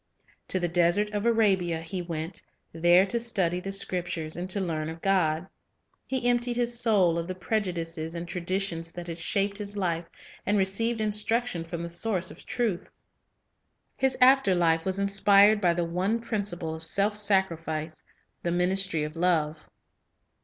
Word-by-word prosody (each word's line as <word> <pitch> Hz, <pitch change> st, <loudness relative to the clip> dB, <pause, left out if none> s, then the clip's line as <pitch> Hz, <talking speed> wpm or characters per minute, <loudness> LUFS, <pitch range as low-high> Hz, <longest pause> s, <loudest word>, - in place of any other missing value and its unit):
To 185 Hz, -, -1 dB
the 175 Hz, -, 0 dB
desert 175 Hz, +5 st, +2 dB
of 210 Hz, +2 st, -1 dB
Arabia 190 Hz, -7 st, +2 dB
he 180 Hz, +3 st, -5 dB
went, 165 Hz, 0 st, -5 dB, 0.3 s
there 175 Hz, +3 st, +5 dB
to 235 Hz, +4 st, -1 dB
study 190 Hz, -7 st, 0 dB
the 195 Hz, +2 st, -5 dB
Scriptures 175 Hz, -5 st, -3 dB
and 180 Hz, +1 st, -5 dB
to 200 Hz, -, 0 dB
learn 160 Hz, -4 st, -2 dB
of 165 Hz, +1 st, -8 dB
God. 180 Hz, -3 st, +1 dB, 0.6 s
He 260 Hz, -2 st, -1 dB
emptied 240 Hz, 0 st, +1 dB
his 240 Hz, 0 st, +2 dB
soul 190 Hz, -8 st, +3 dB
of 165 Hz, -, -4 dB
the 185 Hz, -, -4 dB
prejudices 170 Hz, -5 st, -3 dB
and 170 Hz, 0 st, -5 dB
traditions 175 Hz, -1 st, -2 dB
that 175 Hz, -1 st, -7 dB
had 170 Hz, -1 st, -6 dB
shaped 200 Hz, +4 st, 0 dB
his 205 Hz, 0 st, -4 dB
life, 170 Hz, -3 st, -1 dB, 0.4 s
and 205 Hz, -, +1 dB
received 220 Hz, +4 st, 0 dB
instruction 215 Hz, -2 st, 0 dB
from 170 Hz, 0 st, -6 dB
the 170 Hz, -, -5 dB
Source 185 Hz, 0 st, 0 dB
of -, -, -14 dB
truth. 215 Hz, -7 st, -2 dB, 1.1 s
His 265 Hz, -1 st, +1 dB
after 255 Hz, -7 st, +5 dB
life 165 Hz, -2 st, +2 dB
was 190 Hz, 0 st, -1 dB
inspired 200 Hz, +1 st, +4 dB
by 175 Hz, -3 st, +3 dB
the 175 Hz, 0 st, 0 dB
one 185 Hz, +7 st, -1 dB
principle 200 Hz, -8 st, -3 dB
of 160 Hz, 0 st, -8 dB
self 200 Hz, +5 st, +1 dB
sacrifice, 165 Hz, -6 st, -1 dB, 0.4 s
the 170 Hz, -, -1 dB
ministry 180 Hz, -2 st, +1 dB
of 150 Hz, +1 st, -5 dB
love. 160 Hz, -3 st, 0 dB
185 Hz, 160 wpm, -27 LUFS, 170-205 Hz, 1.1 s, there